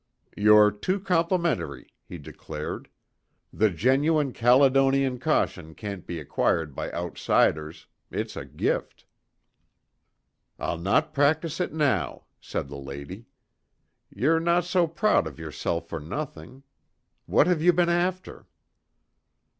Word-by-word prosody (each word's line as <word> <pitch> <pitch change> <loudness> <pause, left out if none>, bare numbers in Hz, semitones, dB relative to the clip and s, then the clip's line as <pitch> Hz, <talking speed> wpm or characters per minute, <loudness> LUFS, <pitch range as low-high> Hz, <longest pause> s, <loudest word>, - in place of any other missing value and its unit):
"You're 105 0 +6
too 185 - -2
complimentary," 170 - -1 0.2
he 90 - -7
declared. 75 0 -7 0.6
"The 110 0 +3
genuine 135 - +1
Caledonian 135 +1 +3
caution 90 - -1
can't 100 -4 -7
be 85 - -4
acquired 75 +1 0
by - - -4
outsiders. 80 -2 0 0.2
It's - - -4
a - - -5
gift." - - -3 1.5
"I'll 85 - -3
no 95 - +2
practise 155 +2 0
it 180 - -1
now," 150 -3 0 0.2
said - - -4
the 70 0 -8
lady. 70 - -9 0.8
"Ye'er 150 +11 +1
no 170 +1 +2
so 175 0 +1
proud 170 - +2
of 75 -3 -9
yourself 80 +1 -4
for 80 - -5
nothing. 130 - -7 0.6
What - - +4
have 175 -3 +1
ye 175 - +4
been 175 0 +3
after?" 180 +2 -2
130 Hz, 115 wpm, -26 LUFS, -, 1.5 s, You're